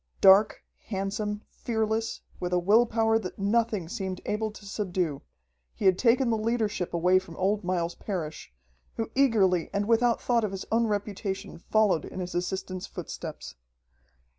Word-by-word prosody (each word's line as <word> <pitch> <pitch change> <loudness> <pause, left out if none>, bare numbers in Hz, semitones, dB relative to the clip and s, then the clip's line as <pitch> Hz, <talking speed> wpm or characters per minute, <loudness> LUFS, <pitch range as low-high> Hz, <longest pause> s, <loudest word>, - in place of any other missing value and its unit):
Dark, 195 +2 +6 0.2
handsome, 210 +1 -3
fearless, 220 -1 -2 0.2
with 180 0 -3
a - - +4
will 210 +7 +4
power 225 0 +2
that 185 -5 -7
nothing 210 -3 +1
seemed 190 -1 -4
able 215 +1 -1
to 210 -1 -13
subdue, 180 -7 -2 0.5
he - - -4
had 185 -1 +5
taken 245 0 +3
the 225 - +1
leadership 215 -5 -1
away 180 +2 +4
from 170 -3 -12
old 200 +2 +1
Miles 175 -1 -1
Parrish, 160 - -5 0.4
who 225 -1 -3
eagerly 205 -10 +3
and 200 +1 -1
without 235 +1 +3
thought 235 -2 +1
of 205 -2 -2
his 190 - -5
own 230 +1 +3
reputation 200 -2 -3
followed 205 -4 +2
in - - -7
his 180 -1 -4
assistant's 185 +1 -3
footsteps. 60 - -7
200 Hz, 155 wpm, -28 LUFS, 185-225 Hz, 0.5 s, Dark